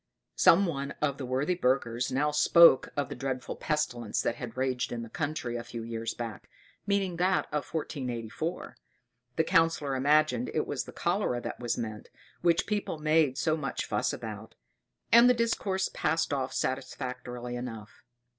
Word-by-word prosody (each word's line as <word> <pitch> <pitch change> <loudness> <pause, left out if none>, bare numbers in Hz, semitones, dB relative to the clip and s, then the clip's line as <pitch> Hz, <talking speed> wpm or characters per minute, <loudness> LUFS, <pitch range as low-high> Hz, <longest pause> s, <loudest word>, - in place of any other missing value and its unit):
Some 195 +4 +6
one 140 -5 -3
of 140 -2 -1
the 130 - -4
worthy 135 +7 0
burghers 125 -6 0
now 145 +3 +1
spoke 150 -1 +6
of 145 -2 0
the - - -4
dreadful 130 0 -4
pestilence 135 -8 -1
that 120 - -1
had 120 -1 -7
raged 130 -1 -1
in 115 -1 -4
the 115 - -9
country 145 -6 -3
a 120 - -3
few 120 -1 -7
years 115 0 -4
back, 115 -5 -7 0.4
meaning 195 -3 0
that 185 +2 +2
of 150 - -2
1484. 135 0 -4 0.6
The 160 - +3
Councillor 165 -5 +2
imagined 140 -2 +2
it - - +1
was - - -3
the - - -9
cholera 120 - 0
that - - -6
was 120 -2 -1
meant, 110 -3 -5 0.3
which 170 0 +3
people 205 -5 -2
made 155 -3 +2
so 155 - +1
much 140 -4 -3
fuss - - 0
about; 110 0 -7 0.6
and 235 +2 +8
the 250 - +5
discourse 200 -5 0
passed 165 -1 0
off 135 -2 -1
satisfactorily 125 -2 -4
enough. 115 -4 -7
135 Hz, 165 wpm, -29 LUFS, 120-160 Hz, 0.6 s, and